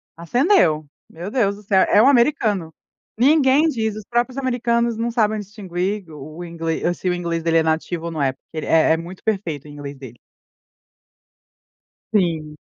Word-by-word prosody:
acendeu. 170 - +2 0.2
Meu 175 +5 -7
Deus 205 -6 +1
do 210 - -14
céu! 195 -2 +3
É 205 - +5
um 245 - +5
americano. 235 - +2 0.5
Ninguém 280 +3 +4
diz. 220 -6 -2
Os 215 -1 -8
próprios 245 +2 -1
americanos 235 -3 0
não 230 +1 -1
sabem 220 -2 +1
distinguir 195 -1 -4
o 150 +2 -10
o 175 - -6
inglês. 165 +1 -2
Se 185 - -1
o - - +1
inglês 170 -1 -2
dele 165 0 +2
é 165 - +4
nativo 160 +1 -1
ou 170 - -3
não 155 - -3
é, 135 -2 +1
porque 155 +3 -9
é 160 0 +4
é - - +1
muito 175 +3 -9
perfeito 185 -10 -2
o - - -11
inglês 145 -1 -8
dele. 130 -3 -11 2.0
Sim. 165 -6 0
185 Hz, 175 wpm, -21 LUFS, 160-230 Hz, 2.0 s, É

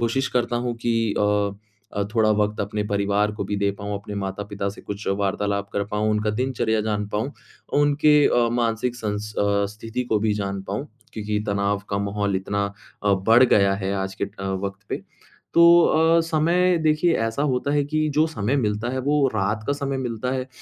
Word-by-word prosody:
कोशिश 125 +3 0
करता 120 0 +1
हूँ 120 0 -2
कि 115 - +2 0.3
अ 105 -1 +2 0.4
अ, 100 - +1
थोड़ा 110 -2 +4
वक़्त 105 0 0
अपने 105 +1 -2
परिवार 100 +1 +1
को - - -1
भी 100 +1 -2
दे 100 0 +1
पाऊँ, 100 0 -4
अपने 100 +1 -6
माता-पिता 100 +1 -3
से 100 - -12
कुछ 100 +1 -7
वार्तालाप 100 0 -1
कर 100 0 0
पाऊँ, 105 +1 0
उनका 105 0 +1
दिनचर्या 110 -2 0
जान 105 -1 -1
पाऊँ। 110 +7 -2 0.5
उनके 145 +1 +4
अ, 120 -1 +3
मानसिक 120 +1 0
संस 105 -1 -4
अ, - - +2 0.3
स्थिति 115 +3 -4
को 105 - +4
भी 110 0 +1
जान 100 -1 -3
पाऊँ, 105 +9 -3 0.3
क्योंकि 105 -1 -2
तनाव 100 0 0
का 100 - 0
माहौल 100 -1 -1
इतना 100 +2 -1 0.4
अ, 100 - +4
बढ़ 115 +3 +7
गया 100 -5 +4
है, 100 0 -2
आज 95 0 -3
के - - +4
अ, 100 0 -10 0.2
वक़्त 100 0 -5
पे। - - -4 0.5
तो 170 - +6 0.2
अ, 165 +1 +4
समय 170 +3 +2
देखिए, 155 +2 +3
ऐसा 115 +5 -1
होता 125 +3 -1
है 145 -1 +2
कि 155 +1 0
जो 155 +2 +4
समय 130 -3 -1
मिलता 110 -2 -1
है, 130 - -2
वो 145 +1 +2
रात 105 +1 -1
का 140 - +1
समय 140 -1 -3
मिलता 125 0 -3
है, 130 0 -3
105 Hz, 195 wpm, -23 LUFS, 100-130 Hz, 0.5 s, बढ़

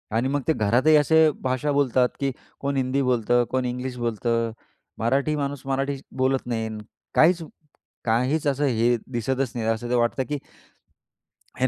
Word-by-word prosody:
आणि 120 +3 +1
मग 145 +1 0
ते 160 - +4
घरातही 120 +6 +3
असे 160 +2 +5
भाषा 130 +3 0
बोलतात 130 -3 +2
की 140 -1 0 0.3
कोण 140 0 -2
हिंदी 130 +1 +1
बोलतं, 120 -1 +2
कोण 130 -1 0
इंग्लिश 125 +1 -4
बोलतं, 115 0 -1 0.5
मराठी 135 +7 +1
माणूस 140 -2 -3
मराठी 135 +1 -1 0.2
बोलत 130 0 +1
नाही, 115 -2 -2 0.5
काहीच 170 +2 +5 0.6
काहीच 125 +7 +1
असं 145 +1 +1
हे 120 -2 +2 0.2
दिसतच 130 +2 -1
नाही. 115 -2 -2
असं 120 +2 0
वाटतं 120 +3 +1
की 150 - -1 1.2
हे 130 - +3
130 Hz, 150 wpm, -24 LUFS, 120-140 Hz, 1.2 s, असे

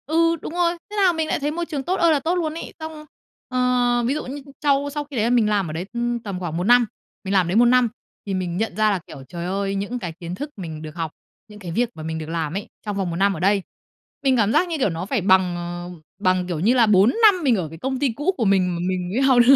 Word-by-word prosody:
Ừ, 330 +2 +3
đúng - - -6
rồi. 345 -1 +2 0.2
Thế 420 - -7
là 385 -4 +4
mình 320 -1 -1
lại - - 0
thấy 295 +1 -1
môi 340 +2 -2
trường 290 -4 -4
tốt 365 +7 0
ơi 335 -1 +5
là 300 - +3
tốt 330 +6 0
luôn 320 -4 -1
ấy. 330 - -7
Xong, 315 -1 -7 0.4
ờ, 250 -1 +2
ví 265 - +1
dụ 305 - -3
như 280 +3 -6 0.2
sau 285 0 +2
sau 295 +1 -3
khi 285 -1 -11
đấy 220 - +1
là - - +2
mình 235 -3 +3
làm 200 -5 +1
ở - - -5
đấy, 165 +3 -4
ưm, 240 0 -1
tầm 200 -5 -5
khoảng 170 -3 -4
1 175 - -1
năm. 240 +3 +5 0.4
Mình 195 0 -2
làm 190 -2 +4
ở - - -3
đấy 180 - 0
1 235 +2 +6
năm 245 -1 +4 0.4
thì 200 - -3
mình 180 -2 -2
nhận 220 -3 -2
ra 215 0 +3
là, 195 - 0
kiểu, 135 - -10
trời 170 +2 -5
ơi, 195 +2 -1
những 205 +6 -3
cái 175 -7 -5
kiến 175 0 -5
thức 290 +9 -5
mình 160 -5 -6
được 155 -1 -8
học, 165 -3 -3 0.4
những 210 -1 -13
cái 180 -4 -6
việc 235 +7 +1
mà 155 - -8
mình 160 0 -3
được 155 0 -6
làm 165 -2 -2
ấy, 200 +2 -4 0.2
trong 205 -1 -3
vòng 190 -3 -1
1 165 - -3
năm 195 +3 +3
ở 160 - -6
đây, 195 +3 +3 0.6
mình 265 -2 +3
cảm 215 -2 +3
giác, 360 - +3
như 335 -2 -2
kiểu, 260 -8 +2
nó 165 +1 -4
phải 225 +1 -1
bằng, 185 -1 +4
ờ, 175 0 -5 0.3
bằng, 185 -2 +1
kiểu 175 -4 -3
như 215 +9 +3
là, 245 -3 +5
4 205 0 +5
năm 390 -5 +6
mình 255 -5 +4
ở 175 -6 -2
cái 160 - -10
công 260 +8 -3
ty 265 -4 +1
cũ 295 +8 +1
của 235 - 0
mình 185 -3 +2
mà - - -4
mình 180 -1 -2
mới 240 +7 0
học 265 -2 +5
được. 275 - +9
215 Hz, 300 wpm, -22 LUFS, 180-275 Hz, 0.6 s, được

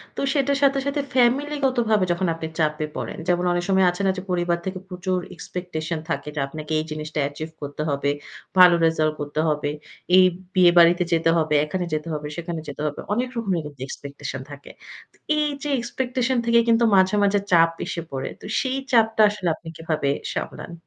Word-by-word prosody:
তো - - -3
সেটার 280 -1 +1
সাথে, 275 0 +4
সাথে 280 +1 0
ফ্যামিলিগতভাবে 255 -5 +2
যখন 175 +2 0
আপনি 165 -1 -5
চাপে 155 -1 +1
পড়েন। - - -5
যেমন 175 0 +2
অনেক 175 0 0
সময় 190 -1 +4
আছে 180 - -6
না - - +4
যে - - -3
পরিবার 175 -1 +1
থেকে 190 0 -4
প্রচুর 185 0 -2 0.2
এক্সপেকটেশন 165 -2 -5
থাকে, 165 - -2
যে - - -2
আপনাকে 155 +2 -8
এই - - -1
জিনিসটা 155 0 -4
অ্যাচিভ 145 +3 -4
করতে 145 +1 -5
হবে। 140 0 0 0.5
ভালো 180 -1 +9
রেজাল্ট 155 -1 +2
করতে 145 +1 -4
হবে। 150 -1 -1 0.5
এই 185 - +8 0.3
বিয়েবাড়িতে 175 -1 +6
যেতে 165 0 +3
হবে, 155 -2 +1
এখানে 180 +3 -3
যেতে 155 +1 -2
হবে, 150 -1 -4
সেখানে 170 -1 -4
যেতে 145 0 -7
হবে। 145 - -5
অনেক 250 +4 -1
রকমের 195 -7 0
কিন্তু 145 -3 -10
এক্সপেকটেশন 140 -1 -7
থাকে। 145 0 -11 0.4
তো - - -27 0.2
এইযে 295 0 -2
এক্সপেকটেশন 255 +1 -1
থেকে 235 0 +5
কিন্তু 230 0 +4
মাঝে, 190 +1 +4
মাঝে 200 0 +3
চাপ 165 -1 +6
এসে 170 - -4
পড়ে। 135 -1 -3
তো - - -11
সেই 260 0 -1
চাপটা 225 -2 +4
আসলে 205 -3 -4
আপনি 165 - -16
কিভাবে 155 -4 -1 0.2
সামলান? 170 - -5
175 Hz, 180 wpm, -23 LUFS, 155-225 Hz, 0.5 s, ভালো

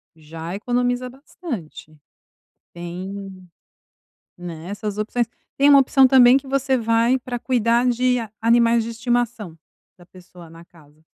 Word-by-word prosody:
já 160 +3 -8
economiza 245 +3 -1
bastante 245 - -9 0.8
tem, 185 +2 -8 0.9
né, 170 -2 -9
essas 205 0 -5
opções. 235 +3 -1 0.3
Tem 280 +1 +4
uma 280 -1 +8
opção 265 0 +4
também 255 -1 +6
que 275 - -3
você 270 -1 0
vai 230 +2 +1
pra 245 -1 -5
cuidar 240 0 +1
de 250 +1 +1
a 225 -3 -6
animais 235 0 +3
de 230 - -6
estimação 235 -6 -2 0.4
da 175 - -18
pessoa 180 -2 -16
na 165 +1 -14
casa, 155 -3 -23
230 Hz, 135 wpm, -21 LUFS, 180-250 Hz, 0.9 s, uma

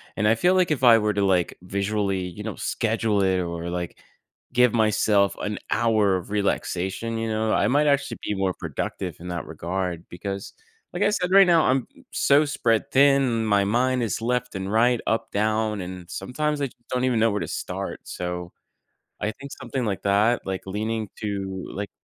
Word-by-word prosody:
And 105 - 0
I 110 - +5
feel, 180 +10 +3
like, 180 -3 +3
if 130 -4 -1
I 115 -1 +8
were 105 0 +1
to, 100 0 0
like, 90 -3 +1
visually, 100 0 -1
you 90 +3 -6
know, 110 - -4
schedule 110 -2 0
it 95 -1 +2
or 85 -1 -3
like, 90 -1 -4 0.6
give 125 -2 +4
myself 105 -3 +3
an 105 0 -3
hour 110 -4 +3
of 90 - -8
relaxation, 100 +2 -1
you 115 0 -2
know, 110 0 0
I - - +3
might 145 +3 +3
actually 140 -1 +1
be 105 - -1
more 95 -1 0
productive 85 +1 -5
in 90 - -9
that 85 -1 -4
regard, 85 +2 -4
because 100 +2 -6 0.4
like 185 +3 0
I 205 - +4
said, 185 -3 -1
right 195 0 +8
now, 165 -2 +5
I'm 130 +1 +2 0.3
so 145 +2 +4
spread 115 -6 0
thin, 135 -4 +4
my 100 -2 +3
mind 125 +4 +1
is 110 0 -2
left 125 -1 -1
and 95 +1 -3
right, 120 +2 +3
up, 110 - 0
down, 110 0 0
and 90 -1 -8
sometimes 145 +10 -2
I - - +2
just 120 -1 -23
don't 125 0 -1
even 120 -3 +1
know 115 0 +4
where 105 - -1
to - - -3
start. - - -4
So, 90 -1 -5 0.7
I 105 - 0
think 140 +5 -11
something 130 -4 -4
like 100 -2 -2
that, 105 +4 +2
like 95 0 -4
leaning 110 +2 -2
to, 95 -2 -4
like 100 +1 -5
105 Hz, 195 wpm, -24 LUFS, 95-120 Hz, 0.7 s, I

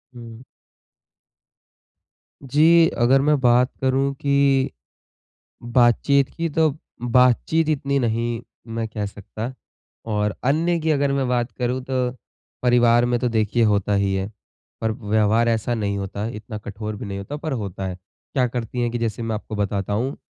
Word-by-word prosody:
हुँ। 115 0 -10 2.0
जी। 160 +5 +5
अगर 130 +3 +4
मैं 150 0 +3
बात 125 0 +4
करूँ 135 +1 +1
कि, 140 -1 +2 0.9
बातचीत 125 +3 +3
की 165 0 -1
तो 160 +1 +3 0.3
बातचीत 125 +6 +3
इतनी 140 -2 0
नहीं 115 -1 -1 0.4
मैं 115 -1 -1
कह 105 -1 -4
सकता। 110 +4 -7 0.6
और 105 0 0
अन्य 165 +6 +2
की 160 - 0
अगर 140 -2 +2
मैं 135 -2 0
बात 120 -1 0
करूँ 125 +1 -1
तो, 130 -1 -1 0.5
परिवार 120 -1 +4
में 120 0 +1
तो 125 - +1
देखिए 110 0 +1
होता 105 -1 +2
ही 100 -1 +1
है। 95 +2 -2 0.5
पर 110 -1 0
व्यवहार 110 +1 +1
ऐसा 115 +1 0
नहीं 100 -3 -1
होता 100 +2 -4
है, 115 - -4
इतना 105 0 -7
कठोर 105 +1 -6
भी 110 - -7
नहीं 100 0 -5
होता, 140 +10 -6
पर 155 0 -4
होता 100 -5 -4
है। 90 - -5 0.4
क्या 130 -3 +3
करती 120 0 -4
है 120 - 0
कि 120 - -3
जैसे 115 0 -2
मैं 115 -1 -2
आपको 110 0 -6
बताता 100 -1 -2
हूँ, 125 +6 -1
120 Hz, 160 wpm, -22 LUFS, 110-135 Hz, 2.0 s, जी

